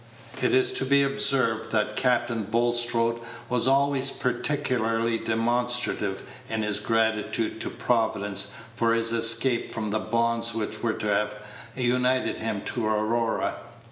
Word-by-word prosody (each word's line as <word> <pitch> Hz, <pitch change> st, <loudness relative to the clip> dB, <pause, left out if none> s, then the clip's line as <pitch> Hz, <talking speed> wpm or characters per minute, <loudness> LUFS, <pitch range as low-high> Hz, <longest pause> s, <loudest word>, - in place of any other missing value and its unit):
It -, -, +2 dB
is 390 Hz, 0 st, +3 dB
to -, -, -1 dB
be 140 Hz, 0 st, +4 dB
observed 135 Hz, -5 st, +1 dB
that 105 Hz, -1 st, 0 dB
Captain 120 Hz, -2 st, +1 dB
Bulstrode 115 Hz, +1 st, +1 dB, 0.3 s
was 125 Hz, 0 st, +1 dB
always 135 Hz, 0 st, +3 dB
peculiarly 120 Hz, -4 st, 0 dB
demonstrative 120 Hz, -3 st, -1 dB, 0.3 s
in 110 Hz, -1 st, -1 dB
his 105 Hz, -1 st, 0 dB
gratitude 110 Hz, 0 st, 0 dB
to -, -, -3 dB
Providence 100 Hz, -4 st, 0 dB, 0.2 s
for 115 Hz, 0 st, +2 dB
his 115 Hz, 0 st, +1 dB
escape 115 Hz, +2 st, +1 dB
from 110 Hz, -2 st, -3 dB
the 110 Hz, -, +1 dB
bonds 115 Hz, +1 st, 0 dB
which 110 Hz, -2 st, -3 dB
were 115 Hz, -2 st, 0 dB
to 105 Hz, -, -4 dB
have 105 Hz, +1 st, 0 dB, 0.4 s
united 125 Hz, 0 st, +1 dB
him 110 Hz, -3 st, -3 dB
to 115 Hz, 0 st, -2 dB
Aurora. 110 Hz, +2 st, 0 dB
115 Hz, 135 wpm, -26 LUFS, 110-125 Hz, 0.4 s, be